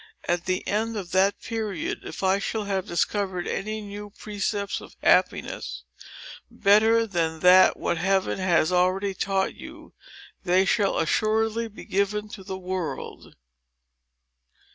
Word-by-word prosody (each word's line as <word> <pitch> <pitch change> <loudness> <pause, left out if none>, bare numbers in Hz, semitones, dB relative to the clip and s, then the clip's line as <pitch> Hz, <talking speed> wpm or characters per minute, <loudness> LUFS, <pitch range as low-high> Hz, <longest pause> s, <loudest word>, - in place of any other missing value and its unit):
At 175 0 0
the 185 0 -2
end 220 +2 -1
of 185 -4 -6
that 195 +2 +2
period, 215 -7 -3
if - - -7
I 190 +1 +3
shall 215 +2 -2
have 195 -1 -2
discovered 185 0 -1
any 215 +2 -3
new 205 0 -8
precepts 205 -1 -3
of - - -13
happiness, 60 0 +1 0.7
better 220 +3 +4
than 165 -5 -1 0.4
what 170 - -2
Heaven 195 +1 +1
has 175 -2 +2
already 185 +2 +1
taught 190 0 -1
you, - - -12 0.5
they 185 +1 +3
shall 200 0 +1
assuredly 220 +6 +1
be 215 - -12
given 210 +2 -1
to 200 -2 -9
the 190 0 -5
world." 185 -2 -5
195 Hz, 130 wpm, -25 LUFS, 185-210 Hz, 0.7 s, better